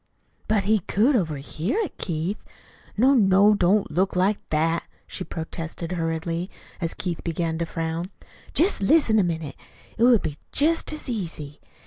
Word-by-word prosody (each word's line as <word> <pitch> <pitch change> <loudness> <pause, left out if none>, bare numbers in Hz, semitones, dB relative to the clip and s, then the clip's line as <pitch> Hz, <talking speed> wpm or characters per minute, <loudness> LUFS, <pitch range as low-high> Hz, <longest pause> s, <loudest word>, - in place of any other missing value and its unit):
"But 215 -2 +2
he 215 +2 +3
could 225 - +2
overhear 160 - -2
it, 375 - -4
Keith. 170 +4 -2 0.6
No, 260 +6 +5
no, 200 -3 +5
don't 200 +1 +2
look 185 +4 0
like 195 +3 +2
that," 165 +2 +1 0.2
she 185 - -5
protested 165 0 -5
hurriedly, 165 +1 -2 0.3
as 165 -1 -1
Keith 175 -3 -4
began 165 -1 -2
to 170 - -2
frown. 165 +1 -3 0.5
"Jest 355 - +3
listen 220 0 +4
a - - +4
minute. 160 -5 -3 0.4
It - - +3
would 240 -3 +5
be 145 -1 -4
jest 320 +3 +2
as 305 -1 -5
easy. 165 - -5
180 Hz, 150 wpm, -24 LUFS, 165-215 Hz, 0.6 s, No